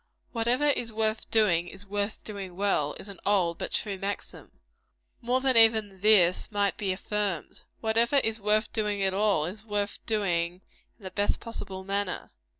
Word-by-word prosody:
"Whatever 240 +4 +1
is 240 -5 -1
worth 220 0 -1
doing, 180 -6 +3
is 195 +3 -10
worth 205 +1 -3
doing 195 -4 -7
well," 180 -7 0
is - - -9
an 200 -3 -10
old 185 -5 +1
but - - -4
true 200 -3 -1
maxim. 200 +1 -5 0.7
More 250 +2 +1
than 260 -1 +3
even 220 -4 +5
this 200 -2 +5
might 200 -1 +1
be 195 -2 -2
affirmed. 200 -3 -3 0.2
Whatever 230 +4 +2
is 225 -5 +1
worth 215 +1 +1
doing 210 -2 -1
at 190 -1 +1
all, 200 -6 +2
is 200 +5 -7
worth 205 -2 -3
doing 180 -5 0 0.4
in 215 - -22
the 190 - -6
best 205 +2 0
possible 195 -5 -6
manner. 200 -1 -3
205 Hz, 165 wpm, -28 LUFS, 190-220 Hz, 0.7 s, even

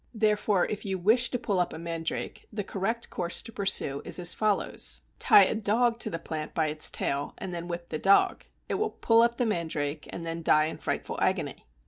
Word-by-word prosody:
Therefore, 210 -3 +2
if 210 - -5
you 195 -2 -2
wish 225 +7 +3
to 250 - -2
pull 205 -6 -1
up 175 - 0
a - - -6
mandrake, 165 0 -5
the 210 -2 -3
correct 210 +5 -3
course 175 -1 0
to 230 - -10
pursue 190 -9 +1
is - - +3
as 175 -1 +3
follows: 215 -2 0 0.2
Tie 420 - +7
a - - +1
dog 230 +2 +1
to - - +2
the 165 - -3
plant 160 -2 -6
by 160 -1 +1
its 150 0 +2
tail, 140 +1 -2
and 185 - -6
then 170 0 -5
whip 170 0 -6
the 155 - -3
dog. 195 +3 +3 0.2
It - - -3
will 435 0 0
pull 230 - +3
up 235 0 +2
the 245 - +1
mandrake, 160 -7 -2
and 170 - -7
then 165 0 -4
die 155 -1 +4
in 155 - -5
frightful - - -3
agony! - - -1
185 Hz, 215 wpm, -28 LUFS, 165-220 Hz, 0.2 s, Tie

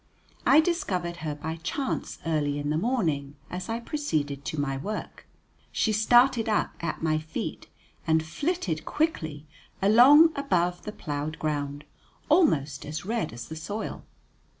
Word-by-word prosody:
I 295 +3 +8
discovered 185 - -1
her 155 -3 -4
by 160 +2 -5
chance 255 - -3
early 150 -3 0
in 145 0 -2
the 155 - +1
morning 160 - -1 0.2
as 180 +2 -5
I 225 +1 -1
proceeded 155 - -2
to 155 - -3
my 135 -1 -1
work. 205 +11 -6 0.4
She 220 - +1
started 240 +2 +4
up 210 - +1
at 170 -1 -3
my 155 -1 +2
feet 155 +1 -5 0.4
and 160 0 +3
flitted 185 - -2
quickly 160 - -2 0.3
along 260 +11 +7
above 180 -11 0
the 210 - -4
ploughed 150 -4 -4
ground, 145 -1 -2 0.5
almost 150 - +3
as 155 +4 -5
red 220 -5 -1
as 115 +1 -8
the 160 - -7
soil. 205 +7 -5
165 Hz, 145 wpm, -27 LUFS, 150-235 Hz, 0.5 s, I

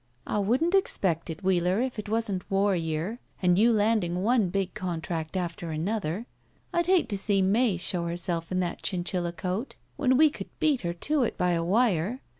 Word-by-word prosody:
"I 210 - -1
wouldn't 255 - +1
expect 185 - +1
it, 165 +4 -6
Wheeler, 185 +1 +2
if 250 -2 -2
it 210 - -6
wasn't 215 -4 -2
war 195 0 +2
year 165 +7 -2 0.2
and 180 0 +3
you 235 +3 +5
landing 205 -5 +1
one 225 -4 +3
big 195 0 -2
contract 170 -3 -4
after 170 -1 -4
another. 180 +4 -2 0.5
I'd 345 0 +1
hate 365 -6 +4
to 200 - -1
see 195 -1 +2
May 205 +1 +2
show 175 0 0
herself 170 -1 -1
in 185 0 +1
that 175 - -3
chinchilla 175 -2 -1
coat 185 +8 -4 0.2
when 260 -3 +3
we 310 0 +6
could - - -8
beat 295 -5 +2
her 170 -1 -2
to 295 - 0
it 240 - -1
by 180 0 +2
a 165 -1 0
wire. 205 +2 +1
190 Hz, 190 wpm, -27 LUFS, 175-230 Hz, 0.5 s, we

